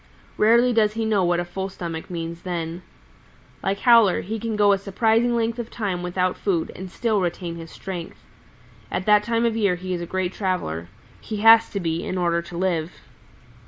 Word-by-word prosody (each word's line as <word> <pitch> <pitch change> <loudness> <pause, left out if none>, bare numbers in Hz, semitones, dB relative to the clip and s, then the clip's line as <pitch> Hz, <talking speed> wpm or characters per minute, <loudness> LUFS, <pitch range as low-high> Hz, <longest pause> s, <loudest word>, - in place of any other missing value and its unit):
Rarely 235 +3 +4
does 215 -2 +3
he 225 0 -2
know 210 -3 +2
what 175 0 +2
a 175 - -2
full 190 +2 -4
stomach 170 -3 -6
means 170 -1 -5
then. 170 -1 -4 0.8
Like 200 +1 -2
Howler 230 -6 +5
he 220 +3 -4
can 225 0 -3
go 205 -1 +4
a 195 - +2
surprising 225 +4 +1
length 230 0 -1
of 235 -1 -5
time 195 -6 -3
without 180 +1 -1
food 175 -5 -1
and 185 0 -7
still 215 +1 0
retain 175 -1 -3
his 165 0 -9
strength. 180 -2 -7 0.7
At 185 - -3
that 210 -1 +5
time 230 +1 0
of 230 -1 +1
year 200 -5 +2
he 185 +1 -5
is 175 - -3
a 170 - -5
great 185 0 -2
traveler. 85 - -2 0.3
He 215 - -6
has 225 0 +8
to 200 - -3
be, 165 -2 -2
in 185 - -3
order 170 -1 +1
to 170 0 -9
live. 175 -2 -1
190 Hz, 195 wpm, -23 LUFS, 175-220 Hz, 0.8 s, has